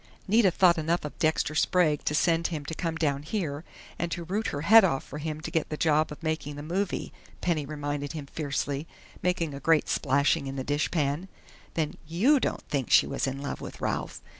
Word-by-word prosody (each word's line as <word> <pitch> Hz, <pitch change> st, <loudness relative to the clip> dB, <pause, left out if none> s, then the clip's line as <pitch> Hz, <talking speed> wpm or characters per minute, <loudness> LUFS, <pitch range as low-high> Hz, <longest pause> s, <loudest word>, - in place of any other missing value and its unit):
"Nita 210 Hz, 0 st, +5 dB
thought 175 Hz, -1 st, +4 dB
enough 165 Hz, +1 st, 0 dB
of 150 Hz, -, -6 dB
Dexter 155 Hz, -1 st, +1 dB
Sprague 155 Hz, -1 st, +2 dB
to 150 Hz, -, +1 dB
send 165 Hz, +1 st, +2 dB
for 170 Hz, -, -4 dB
him 145 Hz, -2 st, -5 dB
to 160 Hz, -, -5 dB
come 165 Hz, 0 st, -2 dB
down 145 Hz, -4 st, 0 dB
here, 155 Hz, -3 st, -3 dB, 0.4 s
and 170 Hz, 0 st, -2 dB
to 175 Hz, -, -3 dB
root 205 Hz, +6 st, -2 dB
her 145 Hz, -, -3 dB
head 220 Hz, +7 st, +8 dB
off 150 Hz, -8 st, +1 dB
for 150 Hz, -, -8 dB
him 155 Hz, 0 st, -4 dB
to -, -, -5 dB
get 160 Hz, -, 0 dB
the 150 Hz, -, -3 dB
job 155 Hz, -1 st, +2 dB
of 150 Hz, -, -9 dB
making 155 Hz, -2 st, -2 dB
the 145 Hz, -, -7 dB
movie," 180 Hz, +5 st, -2 dB, 0.3 s
Penny 155 Hz, -5 st, 0 dB
reminded 145 Hz, -1 st, -3 dB
him 150 Hz, -3 st, -5 dB
fiercely, 145 Hz, 0 st, -3 dB, 0.3 s
making 170 Hz, -4 st, 0 dB
a 140 Hz, -, -6 dB
great 160 Hz, 0 st, +3 dB
splashing 140 Hz, +2 st, +2 dB
in 135 Hz, -, -5 dB
the 130 Hz, -, -3 dB
dishpan. 145 Hz, +3 st, 0 dB, 0.5 s
"Then 155 Hz, -2 st, -1 dB
you 230 Hz, -, +4 dB
don't -, -, -2 dB
think 135 Hz, -4 st, -2 dB
she -, -, +6 dB
was -, -, -2 dB
in 135 Hz, +1 st, -4 dB
love 140 Hz, -, -4 dB
with -, -, -8 dB
Ralph?" -, -, -3 dB
155 Hz, 215 wpm, -28 LUFS, 145-170 Hz, 0.5 s, head